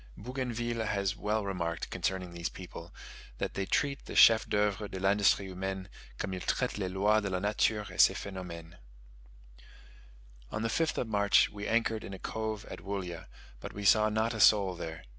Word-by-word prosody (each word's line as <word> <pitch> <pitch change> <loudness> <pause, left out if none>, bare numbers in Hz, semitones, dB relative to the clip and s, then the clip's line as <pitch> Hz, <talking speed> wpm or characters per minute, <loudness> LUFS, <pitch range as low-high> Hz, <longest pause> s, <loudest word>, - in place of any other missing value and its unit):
Bougainville 120 -1 -3
has 100 -2 -1
well 105 0 -1
remarked 85 -4 -3
concerning 90 -2 -2
these 85 -1 -3
people, 85 -2 -10 0.5
that - - -3
they 95 0 -3
treat 140 -1 0
the - - -8
"chefs 110 -1 +7
d'oeuvre 105 0 0
de 95 - -6
l'industrie 100 +1 +3
humaine, 95 0 -5 0.3
comme 95 - -3
ils 90 - -4
traitent 125 +3 -1
les 95 -2 -1
loix 105 +3 +3
de 100 - -3
la 95 - -1
nature 105 +1 +1
et - - +3
ses - - +6
phenomenes." 90 -3 -8 1.7
On 105 - -3
the 115 - 0
5th 160 +7 0
of 120 - -1
March, 100 -1 +3
we 105 0 -6
anchored 115 -1 +1
in 95 - -7
a - - -8
cove 110 +1 -4
at - - -8
Woollya, 95 -4 -5 0.3
but - - -8
we 100 0 -6
saw 110 +2 +5
not 110 +2 0
a 110 - -5
soul 100 -2 +5
there. 80 -1 -7
100 Hz, 180 wpm, -31 LUFS, 95-110 Hz, 1.7 s, chefs